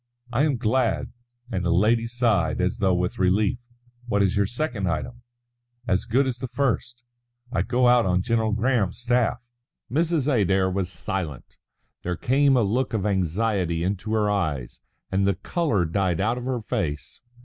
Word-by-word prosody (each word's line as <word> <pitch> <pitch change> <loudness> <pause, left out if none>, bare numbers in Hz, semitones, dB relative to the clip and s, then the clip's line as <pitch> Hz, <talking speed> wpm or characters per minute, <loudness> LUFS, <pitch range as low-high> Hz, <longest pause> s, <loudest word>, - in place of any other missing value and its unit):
"I 135 +6 +3
am 145 -5 +1
glad," 115 +1 0 0.4
and 95 -4 -1
the 90 - 0
lady 110 +7 +3
sighed 115 -10 +1
as 90 0 0
though 95 -3 +3
with 90 0 -2
relief. 95 +4 +2 0.5
"What 100 -3 +2
is 95 - +1
your 100 -1 +2
second 120 - -2
item?" 120 +10 -4 0.7
"As 95 -4 +1
good 130 +5 +2
as 125 -2 -3
the 130 - -4
first. 120 -1 -2 0.5
I 105 - +1
go 125 +1 +2
out 120 -3 +5
on 90 0 +1
General 110 -1 +1
Graham's 110 -4 +1
staff." 120 -1 +1 0.5
Mrs. 160 0 +1
Adair 95 - +2
was 95 -1 -2
silent. 90 - -5 0.5
There 90 0 -2
came 135 +1 +3
a 120 - +3
look 120 +4 0
of 100 -2 -1
anxiety 95 -2 0
into 100 +3 -2
her 105 -1 +2
eyes, 80 -12 -2 0.3
and 95 +1 +2
the 100 - +2
colour 115 - 0
died 90 0 0
out 115 +5 0
of 125 - -7
her 130 -2 -2
face. 95 - -4
105 Hz, 170 wpm, -24 LUFS, 95-120 Hz, 0.7 s, out